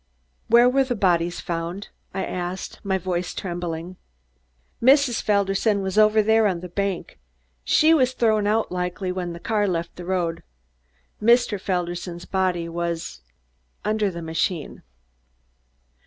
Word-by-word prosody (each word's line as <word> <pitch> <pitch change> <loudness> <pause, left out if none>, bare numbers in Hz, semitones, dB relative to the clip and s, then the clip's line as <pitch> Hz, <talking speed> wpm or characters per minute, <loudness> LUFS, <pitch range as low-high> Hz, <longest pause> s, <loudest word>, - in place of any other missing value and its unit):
"Where 235 +2 +6
were 270 +2 +3
the 255 -2 -2
bodies 175 -3 +1
found?" 170 +3 -4 0.2
I 190 0 -3
asked, 180 +1 -5
my 190 -1 0
voice 180 -1 -3
trembling. 175 -1 -5 0.8
"Mrs. 265 -1 +4
Felderson 200 0 +1
was 190 -1 -3
over 215 0 +5
there 220 0 +4
on 180 -4 -2
the 180 - -7
bank. 195 - -3 0.4
She 315 - +4
was 260 -5 +3
thrown 215 -4 +2
out 220 +1 +1
likely 180 +1 -2
when 180 -2 -4
the 170 - -8
car 210 +2 0
left 170 -2 -3
the 175 - -7
road. 175 -3 -1 0.8
Mr. 230 -3 +3
Felderson's 175 -1 -3
body 185 -3 0
was 170 - -4 0.6
under 215 -1 +1
the 170 -2 -7
machine." 160 0 -2
190 Hz, 135 wpm, -23 LUFS, 175-215 Hz, 0.8 s, Where